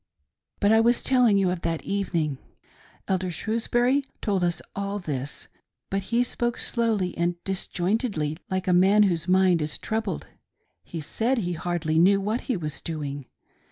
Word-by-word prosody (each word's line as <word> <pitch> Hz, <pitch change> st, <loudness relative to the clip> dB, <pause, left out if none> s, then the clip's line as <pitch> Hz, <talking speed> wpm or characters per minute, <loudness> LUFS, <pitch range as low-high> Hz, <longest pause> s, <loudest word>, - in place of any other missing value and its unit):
But 205 Hz, -, +3 dB
I 220 Hz, -, +6 dB
was 235 Hz, +1 st, +3 dB
telling 245 Hz, -6 st, +4 dB
you 190 Hz, -2 st, +2 dB
of 180 Hz, -2 st, -3 dB
that 165 Hz, -1 st, -2 dB
evening; 170 Hz, -8 st, -1 dB, 0.7 s
Elder 185 Hz, -1 st, 0 dB
Shrewsbury 240 Hz, -, +1 dB, 0.2 s
told 195 Hz, -4 st, 0 dB
us 175 Hz, -1 st, +1 dB, 0.2 s
all 200 Hz, +1 st, -2 dB
this, 145 Hz, -6 st, -5 dB, 0.4 s
but 195 Hz, 0 st, 0 dB
he 235 Hz, +2 st, +3 dB
spoke 240 Hz, 0 st, -2 dB
slowly 220 Hz, -6 st, 0 dB
and 175 Hz, +1 st, 0 dB
disjointedly, 190 Hz, -, -1 dB
like 185 Hz, 0 st, -2 dB
a 180 Hz, -, +4 dB
man 195 Hz, +4 st, +5 dB
whose 170 Hz, -4 st, +1 dB
mind 185 Hz, -2 st, +4 dB
is 150 Hz, 0 st, -3 dB
troubled. 220 Hz, 0 st, -3 dB, 0.6 s
He 165 Hz, -, -6 dB
said 230 Hz, -, 0 dB
he 180 Hz, -6 st, -1 dB
hardly 165 Hz, -2 st, -1 dB
knew 195 Hz, +3 st, +5 dB
what 215 Hz, +5 st, -1 dB
he 250 Hz, -, -2 dB
was 155 Hz, -4 st, -5 dB
doing. 145 Hz, -4 st, -5 dB
190 Hz, 160 wpm, -26 LUFS, 170-220 Hz, 0.7 s, I